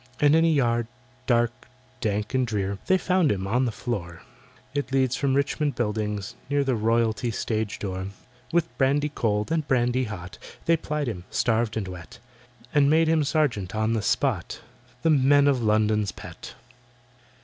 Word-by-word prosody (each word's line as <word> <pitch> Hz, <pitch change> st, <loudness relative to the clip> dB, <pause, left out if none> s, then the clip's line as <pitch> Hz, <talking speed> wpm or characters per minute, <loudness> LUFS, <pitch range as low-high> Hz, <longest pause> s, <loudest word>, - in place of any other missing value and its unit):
And 145 Hz, +1 st, +5 dB
in 165 Hz, -, +5 dB
a -, -, +4 dB
yard, 120 Hz, -7 st, +2 dB, 0.4 s
dark, 120 Hz, -1 st, +1 dB, 0.3 s
dank, 105 Hz, +1 st, -2 dB
and 130 Hz, -1 st, +1 dB
drear, 100 Hz, -3 st, -2 dB
They 190 Hz, -, +5 dB
found 180 Hz, -4 st, +2 dB
him, 95 Hz, -1 st, -2 dB
on 125 Hz, +6 st, +1 dB
the 120 Hz, -, -1 dB
floor— 90 Hz, -7 st, -5 dB, 0.5 s
It 145 Hz, -2 st, -2 dB
leads 130 Hz, -2 st, +2 dB
from 135 Hz, -2 st, +1 dB
Richmond 145 Hz, 0 st, 0 dB
Buildings—near 110 Hz, +5 st, -2 dB
The 135 Hz, -1 st, 0 dB
Royalty 115 Hz, +1 st, +1 dB
stage 110 Hz, -1 st, -2 dB
door. 95 Hz, -1 st, -4 dB, 0.4 s
With 170 Hz, -1 st, 0 dB
brandy 145 Hz, +2 st, +2 dB
cold 105 Hz, -5 st, -1 dB
and 160 Hz, -3 st, 0 dB
brandy 125 Hz, 0 st, +2 dB
hot 95 Hz, -4 st, -8 dB, 0.3 s
They 165 Hz, -, +4 dB
plied 150 Hz, -2 st, -3 dB
him, 90 Hz, -6 st, -5 dB
starved 115 Hz, -1 st, 0 dB
and 100 Hz, -3 st, -2 dB
wet, 90 Hz, -4 st, -9 dB, 0.6 s
And 145 Hz, -1 st, +4 dB
made 160 Hz, +1 st, +4 dB
him 160 Hz, -1 st, +3 dB
sergeant 135 Hz, -, 0 dB
on 110 Hz, +1 st, +1 dB
the 110 Hz, -, 0 dB
spot— -, -, -1 dB, 0.4 s
The 165 Hz, -, +4 dB
Men 145 Hz, 0 st, +5 dB
of 135 Hz, -3 st, +2 dB
London's 105 Hz, -2 st, +2 dB
pet! -, -, -10 dB
120 Hz, 160 wpm, -25 LUFS, 105-145 Hz, 0.6 s, And